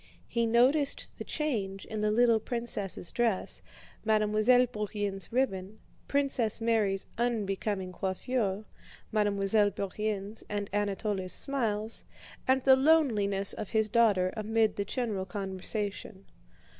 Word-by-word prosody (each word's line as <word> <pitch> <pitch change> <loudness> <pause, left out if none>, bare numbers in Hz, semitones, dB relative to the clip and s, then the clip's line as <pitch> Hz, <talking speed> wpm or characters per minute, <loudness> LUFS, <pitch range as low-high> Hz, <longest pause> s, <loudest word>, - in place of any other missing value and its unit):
He 235 -1 0
noticed 265 +5 +2
the - - -3
change 205 -11 -2
in 215 -1 -4
the 210 - +2
little 230 +1 +4
princess' 220 -6 -3
dress, 230 -5 -1 0.4
Mademoiselle 215 +3 +4
Bourienne's 205 -4 -4
ribbon, 215 -5 -1 0.3
Princess 270 -6 +1
Mary's 220 -4 +1
unbecoming 205 -4 -1
coiffure, 200 +2 -2 0.5
Mademoiselle 205 0 +2
Bourienne's 200 +1 -3
and 205 -1 -3
Anatole's 200 -2 -1
smiles, 225 -5 -2 0.4
and 260 0 +3
the 265 -1 +7
loneliness 230 -10 +3
of 215 - -6
his 220 -1 +1
daughter 205 -5 +3
amid 220 0 +1
the 200 - -2
general 210 -5 -2
conversation. 195 +1 -3
215 Hz, 110 wpm, -30 LUFS, 195-235 Hz, 0.5 s, the